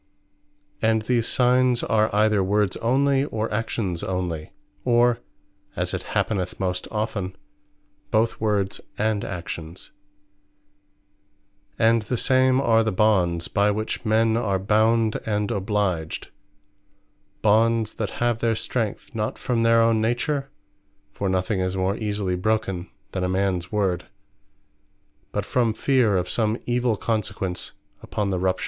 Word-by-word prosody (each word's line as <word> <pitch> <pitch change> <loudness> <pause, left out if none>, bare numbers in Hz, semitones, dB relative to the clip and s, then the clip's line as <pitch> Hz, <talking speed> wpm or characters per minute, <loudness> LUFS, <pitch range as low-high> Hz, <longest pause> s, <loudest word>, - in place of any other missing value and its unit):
And 110 -1 +2
these 115 0 +1
Signes 125 -1 +3
are 110 0 +2
either 105 -1 +3
Words 100 0 +1
onely, 135 +3 +2
or 110 -5 -3
Actions 105 -5 -2
onely; 90 -4 -3 0.3
or 120 -1 +3 0.6
(as - - -2
it - - -2 0.2
happeneth 95 -4 -1
most 90 -1 -2
often) 105 -4 -3 0.7
both 110 +1 +1
Words 100 -3 0 0.2
and 110 -1 0
Actions. 85 -1 -6 1.9
And 115 0 +4
the 120 +4 -2
same 130 +1 +3
are 115 -4 +3
the 110 - 0
BONDS, 90 -5 +2
by 100 +1 +2
which 110 +2 -2
men 110 0 +2
are 100 -4 +1
bound, 110 +3 +2
and 105 -1 -1
obliged: 100 -6 -1 1.1
Bonds, 110 +1 +3
that 105 -3 -3
have 120 -1 +1
their 115 -1 +1
strength, 110 -1 -3
not 110 -2 -2
from 120 -2 -1
their 115 0 +5
own 115 -1 +3
Nature, 135 +5 -1 0.6
(for 100 - -2
nothing 95 +2 0
is 95 0 -1
more 95 +1 +1
easily 105 -4 -2
broken 95 -2 -1 0.2
then 95 - -2
a 90 - 0
mans 95 -2 -1
word,) 95 -4 0 1.3
but - - -2
from 115 -3 +1
Feare 125 -8 +2
of 90 0 -1
some 110 +1 +1
evill 120 -2 +1
consequence 95 -5 -2 0.3
upon 100 -2 -2
the 90 - 0
rupture. 95 0 0
110 Hz, 130 wpm, -24 LUFS, 95-115 Hz, 1.9 s, their